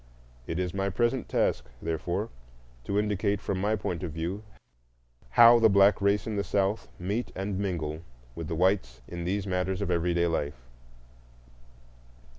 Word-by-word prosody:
It 85 - -3
is 90 -1 -2
my 100 0 0
present 120 +6 0
task, - - 0
therefore, 85 +7 -2 0.6
to 100 - -1
indicate, 105 -1 +1
from 95 -2 -3
my 105 +2 +2
point 90 -5 -3
of 90 -4 -4
view, 85 +6 -3 1.0
how 120 0 +9
the 115 -1 +6
black 100 0 +5
race 100 +1 +2
in 110 -2 -3
the 100 - 0
South 100 +2 0
meet 100 +7 -2
and 95 0 -3
mingle 80 -6 -2 0.3
with 85 +2 -6
the 80 - -3
whites 85 -9 +1
in 85 -1 -6
these 100 +2 -1
matters 95 0 -1
of 100 -3 -1
everyday 85 0 +1
life. 75 -6 -2
95 Hz, 155 wpm, -28 LUFS, 85-100 Hz, 1.0 s, how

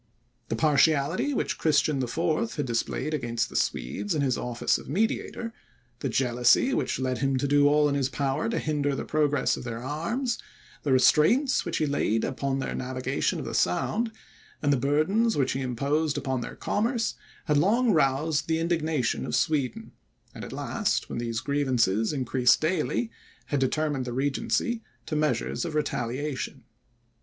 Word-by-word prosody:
The - - 0
partiality 155 - +2
which 275 - -2
Christian 150 -2 +2
IV. 165 - -1
had 145 - -1
displayed 120 +5 -2
against 120 -5 -1
the - - -11
Swedes 160 - -1
in 145 - +1
his 130 -3 +1
office 120 -1 0
of - - -11
mediator, 225 - -1 0.5
the 135 - -2
jealousy 125 - +3
which - - 0
led 130 -1 -1
him 135 -1 +1
to 140 - 0
do 145 0 +4
all 150 0 +4
in 145 - 0
his 135 -2 0
power 140 - -1
to 230 - -1
hinder 145 -2 0
the - - -4
progress 150 -2 +1
of - - -7
their 120 -1 -5
arms, 225 - -2 0.4
the 145 - -1
restraints 160 - +4
which 170 - -2
he 155 - +1
laid 115 -6 0
upon 135 0 -1
their 135 - -3
navigation 130 +1 -1
of - - -5
the - - -5
Sound, 220 - +1 0.5
and 145 -1 +2
the - - +2
burdens 155 - +2
which 135 -2 +2
he 135 - -2
imposed 140 +5 0
upon 130 -3 -2
their - - -6
commerce, 230 +2 0 0.3
had 150 -3 +3
long 230 +8 +3
roused 145 0 +1
the 160 0 +1
indignation 160 -5 0
of - - -2
Sweden; 140 -6 0 0.4
and, - - -8
at - - -7
last, - - -1
when - - -3
these 115 -1 -2
grievances 125 -7 +1
increased 130 -3 +3
daily, 185 +8 0 0.3
had 145 - -1
determined 140 0 0
the 120 - -4
Regency 145 - 0 0.2
to - - -3
measures 150 0 0
of 165 -3 -4
retaliation. 135 -1 -2
145 Hz, 165 wpm, -27 LUFS, 130-160 Hz, 0.5 s, do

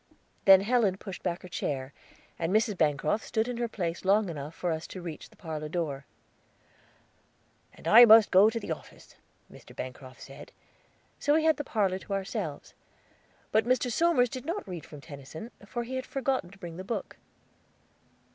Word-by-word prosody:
Then 195 -1 +9
Helen 210 -3 +2
pushed 195 -2 -8
back 175 +1 -3
her - - -8
chair; 140 -5 -4 0.5
and 165 +1 -1
Mrs. 215 0 +2
Bancroft 155 +5 +1
stood 220 +1 -1
in 245 -1 -4
her 240 0 -1
place 175 -6 -4
long 200 +1 +3
enough 150 0 -6
for 175 - -2
us 160 0 -4
to 185 - -8
reach 170 -3 -8
the - - -22
parlor 155 -3 -6
door. 150 -5 -3 1.7
"And - - -10
I 235 +3 +10
must 220 -1 +7
go 195 +4 +7
to 230 +1 -3
the 200 - -6
office," 160 - -9 0.4
Mr. - - -15
Bancroft 130 0 -8
said, 135 - -12 0.7
so 290 - +2
we 315 - +3
had 320 -1 +4
the 290 - -3
parlor 195 -7 0
to 200 - -6
ourselves; 195 -6 -4 0.8
but 220 0 +3
Mr. 250 0 +1
Somers 270 -4 +3
did 255 0 -6
not 340 - -4
read 175 -5 -7
from 150 -2 -11
Tennyson 145 - -9 0.2
for 240 +2 -3
he 260 +2 -5
had 260 - -5
forgotten 265 -8 -1
to 195 - -16
bring 170 -4 -8
the 185 - -6
book. 225 +4 -5
195 Hz, 180 wpm, -29 LUFS, 160-235 Hz, 1.7 s, I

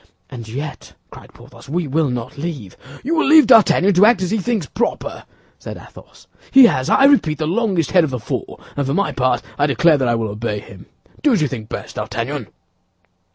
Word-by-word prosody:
"And 115 -3 -9
yet," 140 +6 -7 0.2
cried - - -14
Porthos, - - -16
"we 170 +3 -2
will 150 +1 0
not 125 +2 -5
leave—" 140 - -6 0.3
"You 310 - -2
will 325 - +1
leave 315 +1 +7
D'Artagnan 205 -2 +4
to 185 +3 +5
act 230 -5 +2
as 185 - -3
he 220 - 0
thinks 215 -4 -2
proper," 235 - -4 0.3
said - - -8
Athos. - - -16 0.2
"He 265 -1 +7
has, 130 - +1
I 270 - +4
repeat, 215 - +3
the 155 - -2
longest 185 -2 -1
head 180 -3 +4
of 155 - -1
the 130 - -4
four, - - -6 0.2
and 140 -2 -2
for 140 - -1
my 200 - 0
part 130 -1 0 0.2
I 145 - +2
declare 150 +3 +3
that 130 - 0
I 120 - +1
will 115 -2 -2
obey 105 +1 -4
him. 95 -2 -14 0.3
Do 290 -3 +3
as 205 - +1
you - - +1
think 115 -5 -8
best, - - -8
D'Artagnan." 120 0 -4
150 Hz, 210 wpm, -18 LUFS, 125-200 Hz, 0.3 s, leave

